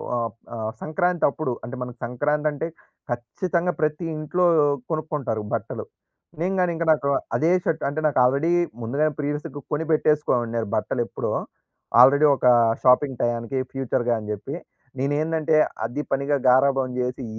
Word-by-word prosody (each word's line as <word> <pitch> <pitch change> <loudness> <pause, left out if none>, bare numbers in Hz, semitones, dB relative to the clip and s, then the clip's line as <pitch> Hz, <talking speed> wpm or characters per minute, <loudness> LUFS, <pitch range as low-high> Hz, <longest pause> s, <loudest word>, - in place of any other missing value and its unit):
ఆహ్, 115 -2 -1 0.2
ఆహ్, 110 -1 -3
సంక్రాంతి 175 +2 0
అప్పుడు 140 -1 -3
అంటే 130 +1 -6
మన 125 0 -4
సంక్రాంతి 145 +5 0
అంటే 150 +2 -3 0.4
ఖచ్చితంగా! 170 +9 -1
ప్రతి 155 +2 0
ఇంట్లో 175 +4 0 0.5
కొనుక్కుంటారు 150 -8 -2
బట్టలు. - - -3 0.6
నేను 185 +3 0
కాని 180 -1 +2
ఇంక, 165 - -2
నాకు 145 -3 +1 0.3
అదే 160 +3 +2
షర్ట్ 160 -1 -1
అంటే 145 +2 -3
నాకు 145 - +1
ఆల్రెడీ 140 +6 +2 0.3
ముందుగానే 145 +7 0
ప్రీవియస్‌గా 145 0 -4
కొనిపెట్టేసుకోమన్నారు 150 -7 +1
బట్టలెప్పుడో. 120 +2 -2 0.7
ఆల్రెడీ 140 +4 +7
ఒక 130 - -4 0.4
షాపింగ్ 130 +1 +4
టయానికి 120 +2 -1
ఫ్యూచర్‌గా 125 -2 0
అని 105 -1 -8
చెప్పి. 120 +8 -6 0.4
నేనేందంటే 155 +3 +1 0.3
అది 120 +6 -3
పనిగా 140 +1 +1
గారాబం 135 0 +3
చేసి 125 +1 -2
140 Hz, 130 wpm, -24 LUFS, 125-155 Hz, 0.7 s, ఆల్రెడీ